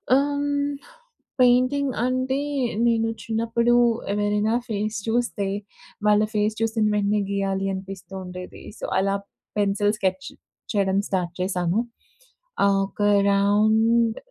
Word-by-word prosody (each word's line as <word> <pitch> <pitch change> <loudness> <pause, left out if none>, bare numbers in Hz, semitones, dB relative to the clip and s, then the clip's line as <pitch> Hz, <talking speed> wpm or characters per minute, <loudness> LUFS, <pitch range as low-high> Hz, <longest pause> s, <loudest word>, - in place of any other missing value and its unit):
అమ్ 285 +1 +1 0.9
painting 255 +3 +3
అంటే 255 +1 0 0.5
నేను 225 -1 +2 0.2
చిన్నప్పుడు 230 +2 +1 0.4
ఎవరైనా 210 +1 +1 0.2
ఫేస్ 215 0 -2
చూస్తే 225 -3 0 0.6
వాళ్ళ 210 0 +5
ఫేస్ 210 0 +1
చూసిన 225 -1 +1
వెంటనే 205 0 +1
గీయాలి 195 -1 -1
అనిపిస్తూ 190 -1 -8
ఉండేది. 180 0 -9 0.2
సో, - - -13
అలా 195 +1 +1 0.4
పెన్సిల్ 205 0 +2
స్కెచ్ 190 -2 -1 0.5
చేయడం 195 -2 +1
స్టార్ట్ 180 -3 -2
చేశాను. 180 +1 0 0.9
ఆహ్, 200 0 +3
ఒక 205 - -9 0.2
అరౌండ్ 215 +3 +3
210 Hz, 105 wpm, -24 LUFS, 195-230 Hz, 0.9 s, వాళ్ళ